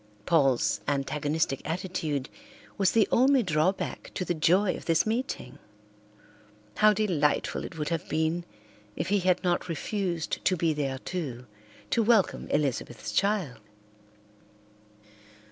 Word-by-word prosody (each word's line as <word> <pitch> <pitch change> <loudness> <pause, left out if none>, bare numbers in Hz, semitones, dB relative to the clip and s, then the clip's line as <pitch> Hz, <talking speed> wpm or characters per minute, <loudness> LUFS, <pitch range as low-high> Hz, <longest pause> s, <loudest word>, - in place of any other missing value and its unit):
Paul's 135 -7 +2
antagonistic 145 0 -1
attitude 160 -5 -3 0.5
was 195 -2 +2
the 225 -3 +4
only 265 +1 +4
drawback 175 +1 -1
to 185 - -2
the 175 - 0
joy 180 +4 +3
of - - -9
this 165 -1 +2
meeting. 225 - -3 1.2
How 215 0 +6
delightful 180 -9 0
it - - -8
would 150 -1 -2
have 165 -3 -3
been 160 +2 0 0.5
if 160 - -3
he 205 0 +3
had 185 0 +1
not 175 0 0
refused 175 0 -2
to 185 - +2
be 165 -1 +1
there 140 -3 -2
too, 130 -6 -5 0.5
to 235 - +3
welcome 220 -3 +2
Elizabeth's 130 -5 -2
child. 200 -10 0
170 Hz, 125 wpm, -28 LUFS, 150-195 Hz, 1.2 s, How